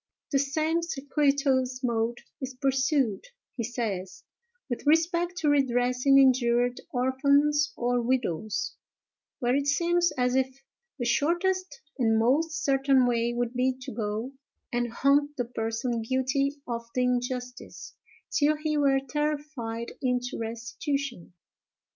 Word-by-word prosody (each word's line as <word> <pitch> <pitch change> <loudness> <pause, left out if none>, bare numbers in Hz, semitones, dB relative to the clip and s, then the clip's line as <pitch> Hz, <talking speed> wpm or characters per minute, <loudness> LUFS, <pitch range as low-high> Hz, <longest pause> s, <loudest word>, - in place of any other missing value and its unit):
"The 275 - +3
same 310 +4 0
circuitous 275 -4 0
mode 235 -1 0 0.2
is 260 0 -5
pursued," 270 -3 +1 0.3
he 235 - -3
says, 200 -6 -4 0.4
"with 250 +2 -5
respect 340 +3 +2
to 320 - -1
redressing 255 -1 +3
injured 245 -2 +3
orphans 280 +4 +2
or 245 0 +1
widows; 225 -5 -1 0.6
where 245 +1 +1
it 280 0 0
seems 345 +4 +2
as 250 -1 +1
if 265 0 0 0.4
the 240 - -3
shortest 350 +9 0 0.2
and 225 -2 +3
most 305 +8 +1
certain 270 -1 +3
way 235 -1 +1
would 240 0 -1
be 255 +1 +1
to 265 +1 -7
go 220 +3 -3 0.4
and 240 -1 0
haunt 285 +4 +2
the 245 - -1
person 230 +1 -2
guilty 260 +4 0
of 235 -1 -3
the 250 - +2
injustice, 250 0 -3 0.4
till 300 +1 +3
he 305 0 -1
were 270 -1 +3
terrified 290 -5 -3
into 250 -2 -1
restitution." 235 - -4
260 Hz, 125 wpm, -27 LUFS, 240-285 Hz, 0.6 s, The